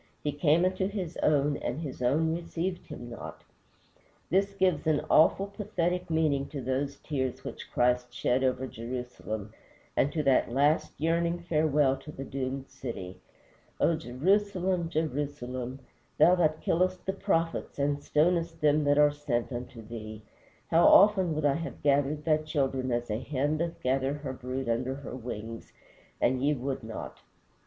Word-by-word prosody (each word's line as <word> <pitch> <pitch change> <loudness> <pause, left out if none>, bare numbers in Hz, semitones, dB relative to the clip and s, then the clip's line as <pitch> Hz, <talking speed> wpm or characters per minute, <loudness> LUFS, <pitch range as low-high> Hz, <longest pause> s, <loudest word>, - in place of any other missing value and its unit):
He 150 - 0
came 150 +4 +3
unto 185 +1 0
his 190 -5 -4
own, 145 -1 +2
and 140 - -3
his 145 -6 -6
own 155 +6 +2
received 175 +2 -3
him 120 - -8
not. 115 - -8 0.9
This 195 +2 +2
gives 185 -6 +1
an 155 -2 +2
awful, 175 +5 +5
pathetic 180 -3 -2
meaning 155 -4 +1
to 145 - -6
those 135 +2 -2
tears 130 -4 -2
which - - -8
Christ 125 0 +2
shed 125 +2 0
over 130 0 +1
Jerusalem, 115 -3 -6 0.4
and 145 - +2
to 155 0 -1
that 135 -3 +3
last 145 +5 +2
yearning 170 +2 +1
farewell 150 -5 +2
to 145 +3 -10
the 135 - -7
doomed 135 0 -4
city: 95 -7 -7 0.6
"O 165 - +3
Jerusalem, 180 +5 0
Jerusalem, 140 -5 -3 0.4
thou 175 - +7
that 155 -3 +2
killest 185 +2 +1
the 190 - -1
prophets 165 -4 -1
and 145 0 0
stonest 165 +2 +1
them 150 0 +3
that 145 0 +3
are 150 0 +6
sent 140 -5 -2
unto 120 -1 -6
thee; 110 -1 -8 0.5
how 165 +1 +6
often 190 -5 +6
would 155 -1 -1
I 140 - +4
have 165 0 -7
gathered 145 +1 +2
thy 155 -2 +4
children 135 -4 -1
as 120 -1 -1
a 105 - -1
hen 145 +3 -1
doth 170 0 -2
gather 135 +2 +1
her 145 -3 -5
brood 130 0 -4
under 125 +3 0
her 135 -2 -7
wings, 115 -2 -7 0.5
and 130 +1 +2
ye 150 +1 +3
would 135 0 -3
not." 110 0 -7
145 Hz, 160 wpm, -29 LUFS, 130-165 Hz, 0.9 s, thou